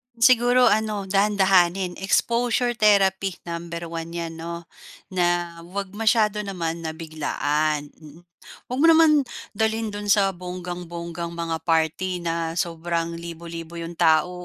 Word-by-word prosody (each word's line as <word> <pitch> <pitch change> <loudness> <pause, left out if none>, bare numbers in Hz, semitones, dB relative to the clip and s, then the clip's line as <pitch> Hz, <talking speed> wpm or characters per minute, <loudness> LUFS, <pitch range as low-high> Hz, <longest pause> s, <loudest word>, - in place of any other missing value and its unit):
Siguro 245 +1 +5
ano, 210 -1 0
dahan-dahanin, 190 -2 +2
exposure 240 +4 +1
therapy 195 -3 +3
number 170 0 -5
one 165 0 -5
niyan, 165 -1 -4
'no? 170 +1 -6 0.5
Na 180 -1 +2 0.4
huwag 195 +1 -5
masyado 215 -1 +2
naman 170 -5 -3
na 160 - -3
biglaan. 155 -2 -1
Mm, 155 +2 -14 0.4
huwag 250 +2 -4
mo 330 - +6
naman 325 -1 +6 0.4
dalhin 220 0 0
do'n 205 0 -5
sa 200 -2 +4
bonggang-bonggang 175 -1 -6
mga 165 -1 -2
party 165 +3 +1
na 165 0 -2
sobrang 170 -1 -2
libo-libo 170 0 -8
'yong 170 +1 -6
tao, 160 +3 +4
175 Hz, 125 wpm, -24 LUFS, 165-205 Hz, 0.5 s, mo